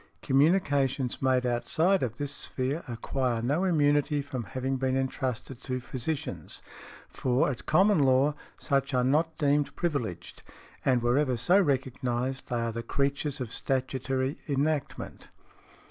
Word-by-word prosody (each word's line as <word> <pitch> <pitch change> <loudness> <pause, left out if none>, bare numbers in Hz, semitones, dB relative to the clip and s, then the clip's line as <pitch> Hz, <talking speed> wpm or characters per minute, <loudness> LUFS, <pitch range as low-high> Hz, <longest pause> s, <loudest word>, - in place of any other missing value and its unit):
Communications 140 -4 +2
made 130 -1 +2
outside 160 +10 +2
of 120 -3 -2
this 145 -1 -3
sphere 135 +5 -3
acquire 120 +1 -1
no 140 +10 0
immunity 145 -3 +2
from 130 -4 -4
having 130 +7 -2
been 130 0 0
entrusted 130 -1 -3
to 130 -1 -3
physicians, 130 +4 -5 0.4
for 130 +3 +1
at 125 - -8
common 190 +4 +4
law 135 +1 +4 0.2
such 135 0 0
are 125 - +3
not 155 +5 +1
deemed 145 0 +1
privileged, 140 - -3 0.4
and 125 -3 +2
wherever 125 +1 +2
so 175 - +4
recognized 130 -3 -1
they 120 -2 0
are 115 0 -1
the 115 +1 -4
creatures 140 +4 -1
of 125 -3 -5
statutory 130 +1 -1
enactment. 145 +1 -2
135 Hz, 130 wpm, -28 LUFS, 125-145 Hz, 0.4 s, common